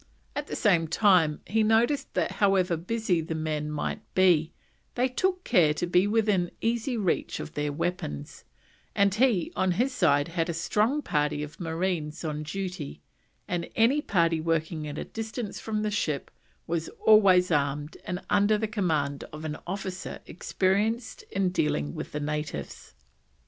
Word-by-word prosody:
At 290 0 -3
the - - -4
same 175 -7 +3
time 170 -4 +3
he 220 +4 +1
noticed 235 +6 +2
that - - +1
however 190 -3 +3
busy 180 0 0
the 160 0 -4
men 155 -1 -2
might 150 -1 -3
be, 175 -4 +4 0.4
they 250 +1 +2
took 365 +8 -1
care 165 -10 +4
to 175 - -1
be 180 +3 +3
within 205 -5 +2
easy 235 +2 -1
reach 195 -5 -1
of - - -7
their 150 0 -1
weapons; 145 - -4 0.5
and 200 -1 +3
he 220 -6 +2
on 185 -1 +2
his 255 +8 0
side 145 - +3
had 165 0 -1
a 170 - -2
strong 215 - +1
party 150 0 0
of 150 0 -9
marines 165 -2 -2
on 150 -1 -3
duty, 160 - -5 0.4
and 175 -1 -2
any 255 +7 +4
party 165 - +1
working 160 -1 -1
at 145 0 -6
a - - -3
distance 225 -1 -5
from 215 -1 -2
the 210 - -1
ship 155 -9 -2 0.3
was 165 -1 -2 0.2
always 190 -4 +6
armed 145 0 0
and 180 +1 -4
under 205 +1 +3
the 220 +1 -1
command 160 -10 -1
of 155 +1 -8
an 150 -1 -3
officer 190 0 -5
experienced 205 +7 -1
in 195 -1 +1
dealing 75 - 0
with - - -6
the 150 - -3
natives. 150 - -5
180 Hz, 160 wpm, -27 LUFS, 155-215 Hz, 0.5 s, always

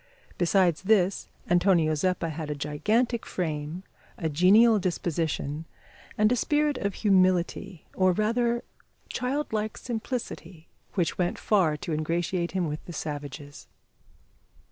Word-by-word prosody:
Besides 175 -2 +3
this, 195 -2 +2 0.2
Antonio 175 -3 +3
Zeppa 170 +2 0
had 155 0 -5
a 150 - -2
gigantic 215 - 0
frame, 160 0 -4 0.3
a 160 - -2
genial 205 +8 +5
disposition, 165 -4 -2 0.5
and 215 +1 +4
a - - +4
spirit 295 +2 +1
of 200 -1 -2
humility, 185 -2 +1
or 185 -1 +3
rather 235 +4 +1 0.5
childlike 250 -5 -2
simplicity, 220 - -5 0.3
which 175 -3 0
went 175 -1 0
far 175 -8 +2
to 160 - -4
ingratiate 170 +3 -1
him 185 -3 0
with 150 0 -5
the 175 - -8
savages. 145 -2 -7
180 Hz, 120 wpm, -27 LUFS, 160-215 Hz, 0.5 s, genial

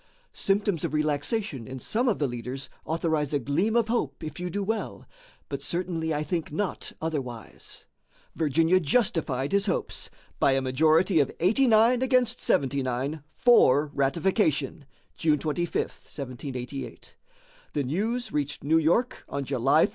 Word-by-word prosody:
Symptoms 195 -4 0
of - - -1
relaxation 150 - -1
in 130 +1 -6
some 235 - 0
of 210 - +1
the 145 - 0
leaders 125 +2 -5 0.2
authorize 160 -3 0
a - - +2
gleam 165 - 0
of 235 -2 +3
hope 230 -6 -2
if 155 0 -6
you 180 0 -3
do 200 +3 -2
well, 220 +2 -3 0.4
but - - -5
certainly 170 -2 -2
I 150 0 0
think 160 +1 -3
not 190 +4 -2
otherwise." 135 -8 -5 0.5
Virginia 165 +3 +3
justified 155 - +1
his 200 +1 +2
hopes - - -1 0.3
by 135 - +4
a 135 - +2
majority 160 +7 +3
of 140 - +2
89 230 +4 +4
against 250 -2 +2
79 135 +2 0
for 150 - +5
ratification 150 - 0 0.3
(June 155 -2 +2
25, 160 +3 -2
1788). 130 0 -5 0.6
The 145 - 0
news 215 - -2
reached 150 0 -2
New 160 +3 +4
York 175 +11 +1
on 140 - -3
July 135 +6 +3
3. - - -4
160 Hz, 140 wpm, -27 LUFS, 140-195 Hz, 0.6 s, for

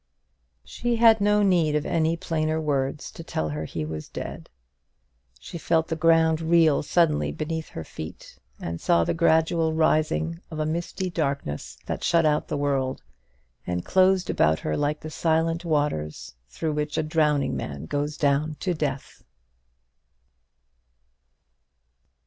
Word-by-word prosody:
She 240 -1 -2
had 225 -2 +5
no 210 0 +3
need 170 -6 +3
of 150 - 0
any 165 0 +1
plainer 155 -1 -1
words 140 -2 -2
to 165 - -10
tell 80 - -3
her 75 +1 -4
he 75 0 -4
was 75 0 -6
dead. - - -7 0.9
She 170 - -8
felt 160 +1 +1
the 160 - -1
ground 160 0 +3
reel 165 -2 +4
suddenly 155 -1 +2
beneath 160 +1 -4
her 80 - -7
feet, 80 0 -10 0.2
and 85 0 -5
saw 85 0 +3
the - - 0
gradual 160 0 +2
rising 160 +1 +1
of 160 - -7
a 155 - -1
misty 170 +3 -3
darkness 140 - -3
that - - -4
shut 165 -1 +3
out 150 -1 +1
the 150 - -2
world, 135 -2 -1 0.6
and 90 0 -2
closed 190 0 +3
about 80 +1 +3
her 75 - -1
like 145 +1 -1
the 155 - -7
silent 165 +1 0
waters 145 - -2 0.2
through 155 - -3
which 150 0 -2
a - - +1
drowning 150 -2 +1
man 70 0 -5
goes 145 - -2
down 145 +2 +1
to 185 - 0
death. 145 -4 -4
155 Hz, 145 wpm, -25 LUFS, 140-165 Hz, 0.9 s, had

